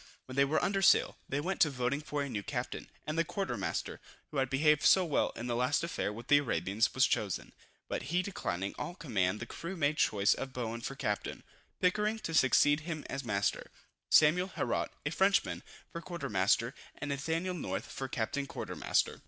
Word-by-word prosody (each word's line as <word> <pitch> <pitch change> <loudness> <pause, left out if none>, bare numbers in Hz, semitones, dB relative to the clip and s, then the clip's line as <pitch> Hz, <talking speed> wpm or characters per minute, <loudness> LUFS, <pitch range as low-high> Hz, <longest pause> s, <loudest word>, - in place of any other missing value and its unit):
When 130 - -9
they 140 0 +5
were 155 +3 +1
under 195 0 +1
sail, - - +4
they 140 - 0
went 185 +5 -2
to 155 - +6
voting 130 +1 -1
for 150 -1 -2
a - - -3
new 110 -6 -3
captain, - - -4 0.2
and 155 +2 -2
the - - +4
quarter 190 -4 -3
master, 95 -6 -3 0.3
who 150 - -4
had 135 -1 +1
behaved 150 +2 +3
so 190 -1 +6
well 155 - +1
in 115 - -5
the 120 -1 -1
last 125 +6 +1
affair 170 -10 -2
with 115 +3 -8
the 145 - +6
Arabians, 105 - 0
was - - +5
chosen; - - -1 0.3
but - - -2
he 180 +2 +2
declining 100 - -3
all 175 - -4
command 105 - 0
the - - -5
crew 170 +10 -6
made 150 -1 +1
choice 100 -7 +3
of 135 -1 -6
Bowen 115 -2 -3
for 135 - -5
captain, 105 -7 -3 0.4
Pickering 210 +4 +2
to 165 -7 -5
succeed 145 +1 +5
him 155 -1 -5
as 140 +1 -3
master, 100 -4 -1 0.4
Samuel 170 +4 +5
Herault, - - -1 0.2
a 145 - 0
Frenchman, 195 +4 +2 0.3
for 170 - -6
quarter 170 0 -5
master, 105 +5 +2 0.2
and 145 - -5
Nathaniel 160 +6 -1
North 175 - -3
for 135 - -4
captain 140 +3 -2
quarter - - -6
master. - - +1
140 Hz, 200 wpm, -32 LUFS, 120-165 Hz, 0.4 s, to